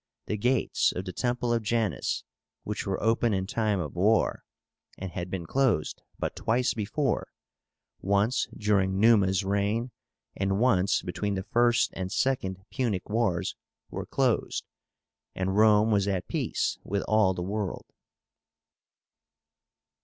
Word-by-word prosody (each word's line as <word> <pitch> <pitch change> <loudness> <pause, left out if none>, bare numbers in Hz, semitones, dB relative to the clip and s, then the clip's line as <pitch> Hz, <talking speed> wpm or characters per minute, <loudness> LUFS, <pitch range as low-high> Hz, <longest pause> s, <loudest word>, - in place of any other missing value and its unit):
The 105 - -2
gates 125 +3 +1
of 90 - -5
the 90 - -5
temple 120 +3 0
of 115 - +1
JANUS 110 - -1 0.4
which - - -4
were - - -1
open 115 -1 +2
in 95 0 -1
time 105 -1 0
of 80 -4 -4
war, 105 +5 +2 0.5
and 95 -1 -6
had 90 -1 -5
been 90 -2 -4
closed 130 - 0 0.2
but - - -3
twice 120 +3 +1
before, 115 +5 -1 0.7
once 100 +5 +1
during 95 -2 +1
Numa's 100 -3 +4
reign, 100 +5 0 0.4
and 95 0 0
once 100 -6 +3
between 100 +3 -2
the 95 - -3
First 120 +3 +2
and 95 -1 -4
Second 105 -7 0
Punic 110 -8 -2
Wars 105 -7 0 0.4
were - - -5
closed, - - 0 0.7
and 95 +1 -1
Rome 110 +1 +5
was 100 -1 +2
at 95 -3 -1
peace - - -1
with 100 +1 -2
all 105 -4 +3
the 90 - -3
world. 100 0 -3
105 Hz, 135 wpm, -28 LUFS, 95-115 Hz, 0.7 s, Rome